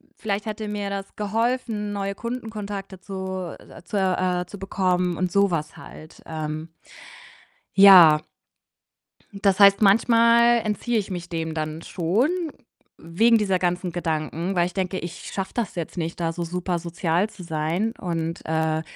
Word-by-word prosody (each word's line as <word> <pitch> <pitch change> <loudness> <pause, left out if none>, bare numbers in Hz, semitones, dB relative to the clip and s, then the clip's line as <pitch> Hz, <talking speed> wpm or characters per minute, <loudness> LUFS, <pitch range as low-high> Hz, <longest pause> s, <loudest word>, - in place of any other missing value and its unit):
v - - -30
vielleicht 205 0 -2
hätte 215 0 -4
mir 205 -1 -3
das 195 0 -6
geholfen, 220 0 -1
neue 200 0 -2
Kundenkontakte 210 -5 -6
zu, 190 -2 -5
äh - - -14
zu, 205 - -4
äh 185 -2 +1
zu 195 +3 -11
bekommen” 180 -2 0
und 185 -1 -1
so 200 0 +3
was 155 -2 -3
halt. 155 +1 -13
Ähm 155 0 -5 1.1
ja. 180 -6 +9 1.1
Hm, 200 - -8
das 195 -1 +2
heißt, 200 +1 +7
manchmal 235 +3 +5
entziehe 225 +2 -1
ich 200 -2 -2
mich 175 -1 -5
dem 160 -1 -3
dann 155 0 -4
schon 190 - 0 0.7
wegen 225 +8 +3
dieser 195 -4 +1
ganzen 175 -1 -1
Gedanken, 165 +2 -2
weil 175 -1 +3
ich 180 - -5
denke: 190 -1 -2
„Ich 175 +1 -8
schaffe 195 -1 -4
das 235 -5 -3
jetzt 170 +1 -5
nicht, 165 0 -3
da 165 -1 -1
so 170 +1 -4
super 180 +1 -2
sozial 170 +3 -1
zu 185 - -12
sein 170 +7 -1
und, 165 -2 -3
äh, 160 0 0
185 Hz, 160 wpm, -24 LUFS, 170-205 Hz, 1.1 s, ja